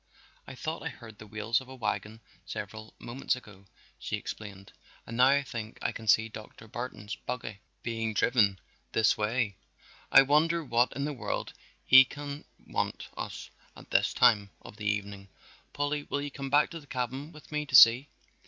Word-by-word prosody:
"I - - -8
thought 160 +5 -4
I - - -3
heard 110 -3 -13
the 110 - -11
wheels 110 +3 0
of 130 - -13
a 130 - -9
wagon 110 -2 -3 0.3
several 110 +3 -7
moments 130 +3 -2
ago," 105 -6 -14 0.3
she - - -3
explained, 100 -2 -8 0.3
"and 115 - -7
now 125 +2 +6
I 140 +1 +4
think 115 -4 -7
I - - -1
can 110 - -9
see 110 +2 +5
Dr. 110 0 -11
Barton's 110 -2 -6
buggy 115 -4 -6 0.2
being 115 -2 -2
driven 100 -5 +3 0.3
this 110 -1 +4
way. 105 -1 -1 0.5
I - - +9
wonder 160 +4 +3
what 120 -2 +2
in 140 +1 -2
the 150 - -2
world 130 - -4 0.3
he 130 0 +9
can 145 +2 -7 0.2
want - - -3
with - - -15
us - - -6 0.2
at - - -15
this - - +3
time 110 -5 +4
of - - -11
the 105 -1 -4
evening? 100 -1 -3 0.4
Polly, 145 +1 -1
will 145 - -1
you 145 - -5
come 135 -1 -6
back 145 +2 +4
to 165 - -6
the 145 - -17
cabin 130 +4 -4
with 155 -1 -15
me 150 0 -2
to 130 - 0
see." 125 +4 +8
120 Hz, 185 wpm, -29 LUFS, 110-140 Hz, 0.5 s, I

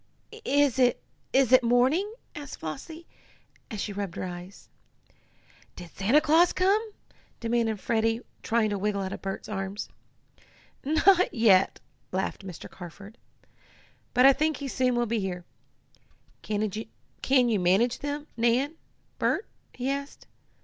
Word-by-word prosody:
"Is 285 - +2
it 245 -1 +4 0.3
is 265 -2 +3
it 255 0 +8
morning?" 255 - +2 0.2
asked 290 -2 -8
Flossie, 320 - -7 0.6
as 215 - -6
she 205 - -3
rubbed 200 -3 -4
her - - -4
eyes. 180 +1 -8 1.1
"Did 175 -2 -10
Santa 225 +10 +3
Claus 320 +3 +4
come?" 410 +4 +2 0.5
demanded 230 -2 0
Freddie, 225 +1 0 0.2
trying 225 -2 +1
to 200 - -2
wiggle 205 0 -1
out 190 - -4
of - - -7
Bert's 195 0 -5
arms. 195 -1 -4 0.9
"Not 350 +6 +4
yet," 200 -5 +4 0.3
laughed 190 +2 -2
Mr. 185 -4 -8
Carford. 195 +5 -11 1.0
"But 250 +1 +6
I 275 - +9
think 310 +2 0
he 280 - -5
soon 255 -1 +1
will 240 0 +1
be 230 0 -1
here. 180 -3 -4 1.0
Can 210 -1 -2 0.8
you 220 -4 +1
manage 195 +7 +2
them, 290 +1 -4
Nan 245 +7 +1 0.4
Bert?" 410 - +1 0.3
he 255 +1 -5
asked. 280 +1 -4
235 Hz, 135 wpm, -27 LUFS, 200-280 Hz, 1.1 s, I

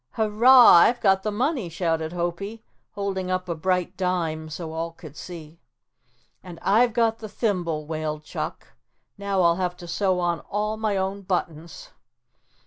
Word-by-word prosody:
"Hurrah, 230 +1 +7
I've 235 +8 +5
got 190 -2 +3
the 215 - -2
money," 245 - -1
shouted 165 -2 -2
Hopie, 180 +6 -4 0.3
holding 195 -2 -3
up 185 0 -2
a 170 - -1
bright 180 +2 -1
dime 165 -4 -2
so 160 +1 -6
all 165 +1 -4
could 155 -3 -13
see. 165 -2 -10 0.8
"And 180 -2 -10
I've 230 +4 +3
got 225 -1 +1
the 215 - -8
thimble," 175 -9 -2
wailed 155 -1 -4
Chuck. - - -6 0.5
"Now 200 -2 0
I'll 170 0 +3
have 180 -1 -2
to 175 - -10
sew 185 +1 0
on 175 -2 0
all 210 +1 -1
my 215 -2 -1
own 190 +1 -2
buttons." 170 -4 -4
185 Hz, 155 wpm, -24 LUFS, 165-205 Hz, 0.8 s, Hurrah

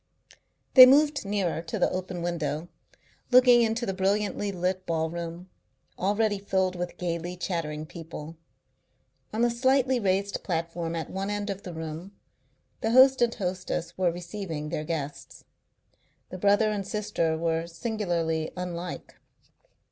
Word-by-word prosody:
They 255 -1 +12
moved 290 0 +4
nearer 195 -5 -1
to 165 - -5
the - - +2
open 185 -1 -4
window, 170 -1 -2 0.6
looking 250 -1 +7
into 230 +1 0
the 195 - -2
brilliantly 200 +2 0
lit 185 0 -2
ballroom, 170 +2 -3 0.5
already 205 +2 +1
filled 190 -2 0
with 175 0 -5
gaily 175 0 -3
chattering 160 -4 -3
people. 165 -1 -9 1.0
On 225 +2 +1
a 240 - +2
slightly 260 +1 +2
raised 200 -1 0
platform 165 -1 -3
at 165 - -4
one 195 +1 -3
end 205 0 -2
of 195 0 -6
the 180 - -7
room 160 +4 -6 0.7
the 225 - -1
host 260 +2 +6
and 235 -1 +2
hostess 180 -3 -3
were 180 -2 +2
receiving 170 -3 -5
their 150 - -3
guests. 150 -3 -5 0.9
The 185 - -6
brother 205 +3 +3
and 200 -2 -3
sister 200 -7 -1
were 165 0 -1
singularly 170 -4 -2
unlike. 180 -1 -6
185 Hz, 135 wpm, -27 LUFS, 165-210 Hz, 1.0 s, They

